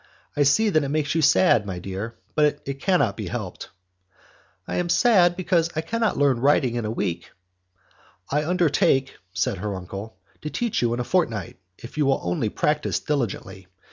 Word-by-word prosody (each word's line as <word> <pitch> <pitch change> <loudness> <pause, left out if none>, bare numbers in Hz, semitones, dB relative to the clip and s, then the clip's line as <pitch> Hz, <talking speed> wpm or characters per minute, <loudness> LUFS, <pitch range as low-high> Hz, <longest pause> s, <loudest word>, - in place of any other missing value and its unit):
I 145 - 0
see 175 +11 +4
that 155 -6 +2
it 140 - -3
makes 150 -1 0
you 165 - +1
sad, 150 - +4
my 95 -2 -4
dear, 100 +5 -6 0.2
but 150 -1 +2
it 140 0 -5
cannot 180 - +2
be - - -5
helped." - - -6 1.0
"I - - -3
am 175 -1 -1
sad, 180 -5 +4
because 175 -2 +1
I 155 - 0
cannot 225 +6 -1
learn 140 -4 +3
writing 135 -2 +3
in 120 -2 -2
a - - -2
week." 85 -6 -3 1.0
"I 150 +2 +1
undertake," 155 -6 +1
said 95 0 -1
her 100 +1 -3
uncle, 95 +4 -8 0.2
"to 150 - -4
teach 235 +6 -1
you 120 -1 +1
in - - -5
a - - 0
fortnight, 115 - -1 0.2
if 120 +6 -9
you 145 - +3
will 135 - +2
only 90 +5 -1
practice 150 +7 0
diligently. 115 -9 -3
140 Hz, 180 wpm, -24 LUFS, 110-165 Hz, 1.0 s, see